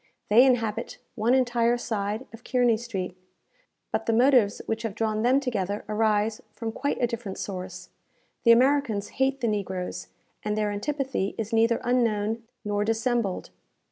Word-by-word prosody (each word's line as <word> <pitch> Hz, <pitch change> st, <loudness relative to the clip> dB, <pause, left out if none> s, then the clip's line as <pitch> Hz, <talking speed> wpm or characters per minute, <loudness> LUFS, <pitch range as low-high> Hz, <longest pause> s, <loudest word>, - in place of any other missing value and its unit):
They 235 Hz, +4 st, +8 dB
inhabit 230 Hz, -5 st, +1 dB, 0.2 s
one 235 Hz, +2 st, +2 dB
entire 240 Hz, -2 st, +2 dB
side 215 Hz, 0 st, -3 dB
of 225 Hz, +1 st, -12 dB
Kearney 245 Hz, -3 st, +3 dB
Street; 200 Hz, -6 st, -4 dB, 0.8 s
but -, -, -2 dB
the 230 Hz, -, +3 dB
motives 245 Hz, -3 st, +4 dB
which 225 Hz, 0 st, -2 dB
have 225 Hz, -4 st, -4 dB
drawn 215 Hz, -1 st, 0 dB
them 250 Hz, +4 st, +4 dB
together 205 Hz, -7 st, -2 dB
arise 215 Hz, 0 st, +1 dB
from 225 Hz, -1 st, -4 dB
quite 285 Hz, +5 st, -2 dB
a 245 Hz, -, +3 dB
different 230 Hz, -4 st, -5 dB
source. 185 Hz, -2 st, -6 dB, 0.5 s
The 235 Hz, -, +7 dB
Americans 245 Hz, -4 st, +3 dB
hate 270 Hz, 0 st, +2 dB
the 235 Hz, -, +1 dB
negroes, 185 Hz, -, -3 dB, 0.3 s
and 210 Hz, 0 st, -2 dB
their 210 Hz, -1 st, 0 dB
antipathy 260 Hz, -1 st, -2 dB
is 225 Hz, 0 st, -4 dB
neither 230 Hz, +1 st, +3 dB
unknown 225 Hz, -3 st, +1 dB, 0.2 s
nor 205 Hz, 0 st, 0 dB
dissembled. 225 Hz, -2 st, -1 dB
225 Hz, 150 wpm, -26 LUFS, 205-245 Hz, 0.8 s, They